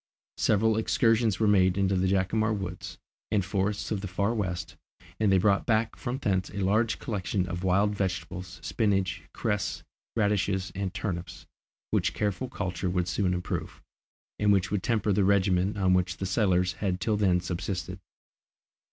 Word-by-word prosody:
Several 110 Hz, +1 st, +3 dB
excursions 110 Hz, -2 st, +2 dB
were 110 Hz, -, +3 dB
made 95 Hz, -2 st, +4 dB
into 95 Hz, -1 st, +2 dB
the 95 Hz, 0 st, +1 dB
Jacamar 100 Hz, +4 st, +1 dB
woods 95 Hz, -3 st, -5 dB, 0.3 s
and 100 Hz, -3 st, +1 dB
forests 100 Hz, +1 st, -1 dB
of 105 Hz, -3 st, -1 dB
the 100 Hz, -, -4 dB
Far 100 Hz, +4 st, 0 dB
West, 95 Hz, -6 st, -3 dB, 0.4 s
and 105 Hz, -3 st, +3 dB
they 95 Hz, -, +5 dB
brought 100 Hz, +1 st, +2 dB
back 110 Hz, -1 st, +1 dB
from 125 Hz, +2 st, -4 dB
thence 95 Hz, -7 st, 0 dB
a 100 Hz, -, -9 dB
large 110 Hz, +4 st, +2 dB
collection 95 Hz, -3 st, -2 dB
of 90 Hz, +1 st, -4 dB
wild 100 Hz, +3 st, +2 dB
vegetables, 95 Hz, -1 st, -4 dB
spinage, 95 Hz, -6 st, 0 dB
cress, 105 Hz, -5 st, -2 dB, 0.3 s
radishes, 100 Hz, -4 st, +1 dB
and 95 Hz, -1 st, -3 dB
turnips, 90 Hz, -4 st, -4 dB, 0.5 s
which -, -, +1 dB
careful 105 Hz, +4 st, -1 dB
culture 90 Hz, -6 st, -3 dB
would 90 Hz, -1 st, 0 dB
soon 90 Hz, +1 st, 0 dB
improve, 90 Hz, -1 st, -3 dB, 0.6 s
and 105 Hz, 0 st, +4 dB
which 95 Hz, -1 st, +2 dB
would 105 Hz, -2 st, 0 dB
temper 110 Hz, -2 st, +1 dB
the 100 Hz, +1 st, +2 dB
regimen 95 Hz, 0 st, +2 dB
on 95 Hz, -2 st, +3 dB
which 90 Hz, -1 st, +1 dB
the 95 Hz, -, -3 dB
settlers 90 Hz, -2 st, +2 dB
had 95 Hz, -3 st, 0 dB
till 105 Hz, +4 st, 0 dB
then 95 Hz, -4 st, +3 dB
subsisted. 90 Hz, +1 st, -4 dB
95 Hz, 160 wpm, -28 LUFS, 90-105 Hz, 0.6 s, they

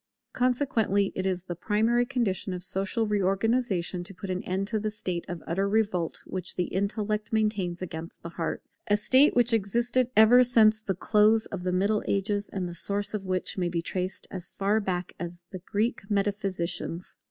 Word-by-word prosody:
Consequently 240 Hz, -6 st, +1 dB
it 190 Hz, 0 st, -2 dB
is 185 Hz, -2 st, -1 dB
the 180 Hz, -, -5 dB
primary 225 Hz, +6 st, +1 dB
condition 215 Hz, -7 st, -1 dB
of 180 Hz, -, -5 dB
social 195 Hz, +5 st, +1 dB
reorganization 200 Hz, -2 st, 0 dB
to 185 Hz, +2 st, -10 dB
put 190 Hz, +1 st, -5 dB
an 185 Hz, 0 st, -2 dB
end 190 Hz, +2 st, -1 dB
to 220 Hz, 0 st, -1 dB
the 215 Hz, +1 st, -1 dB
state 185 Hz, -5 st, -4 dB
of 175 Hz, -2 st, -6 dB
utter 195 Hz, +4 st, 0 dB
revolt 200 Hz, -6 st, 0 dB
which 185 Hz, -1 st, -4 dB
the 180 Hz, -, +1 dB
intellect 210 Hz, +3 st, -2 dB
maintains 205 Hz, -5 st, 0 dB
against 165 Hz, -2 st, -7 dB
the 170 Hz, -, -5 dB
heart; 165 Hz, -1 st, -4 dB, 0.2 s
a 205 Hz, -, +3 dB
state 260 Hz, +7 st, +4 dB
which 245 Hz, 0 st, +4 dB
has 225 Hz, -, +5 dB
existed 235 Hz, +4 st, 0 dB
ever 235 Hz, +3 st, +8 dB
since 220 Hz, -3 st, +4 dB
the 195 Hz, -3 st, -2 dB
close 215 Hz, +4 st, +3 dB
of 195 Hz, -, -6 dB
the 180 Hz, 0 st, -1 dB
Middle 200 Hz, +4 st, +1 dB
Ages 200 Hz, +1 st, 0 dB
and 185 Hz, -2 st, -3 dB
the 175 Hz, -, -6 dB
source 205 Hz, +3 st, -2 dB
of 200 Hz, -3 st, -4 dB
which 185 Hz, +1 st, -1 dB
may 175 Hz, -1 st, 0 dB
be 170 Hz, -1 st, -2 dB
traced 185 Hz, +2 st, -3 dB
as 185 Hz, -2 st, -6 dB
far 200 Hz, +2 st, +1 dB
back 185 Hz, -3 st, -3 dB
as 175 Hz, 0 st, -6 dB
the 185 Hz, -, -6 dB
Greek 205 Hz, +2 st, -2 dB
Metaphysicians. 195 Hz, -4 st, -2 dB
200 Hz, 185 wpm, -27 LUFS, 185-220 Hz, 0.2 s, ever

